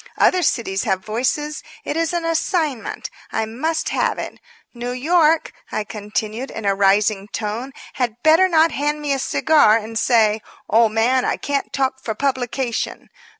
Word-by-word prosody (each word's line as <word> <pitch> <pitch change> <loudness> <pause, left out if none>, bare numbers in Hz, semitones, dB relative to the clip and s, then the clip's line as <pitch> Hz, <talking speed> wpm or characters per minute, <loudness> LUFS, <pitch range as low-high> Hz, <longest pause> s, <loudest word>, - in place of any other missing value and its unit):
Other 365 - +4
cities 220 - 0
have 190 -2 -1
voices. 265 +7 -1 0.2
It - - -2
is 330 -1 0
an 345 -1 -2
assignment. 325 -5 -1 0.2
I 220 - 0
must 310 +9 -2
have - - 0
it. - - -6 0.3
New 245 0 -4
York," 320 +4 +2 0.2
I 215 - -1
continued, 215 +4 -4
in 220 - -7
a 200 - +3
rising 200 +1 +2
tone, 220 +5 -4 0.2
"had 245 -5 -1
better 325 +4 +5
not 325 -1 +4
hand 295 +1 -1
me 295 -1 -1
a 270 - -1
cigar 290 -5 +4
and 225 0 -4
say: 220 -2 +3 0.3
'Old 225 -1 +4
man, 250 +4 +2
I - - 0
can't 280 -1 -2
talk 265 -1 -1
for 220 - -3
publication.' 255 -2 -2
250 Hz, 160 wpm, -20 LUFS, 220-300 Hz, 0.3 s, better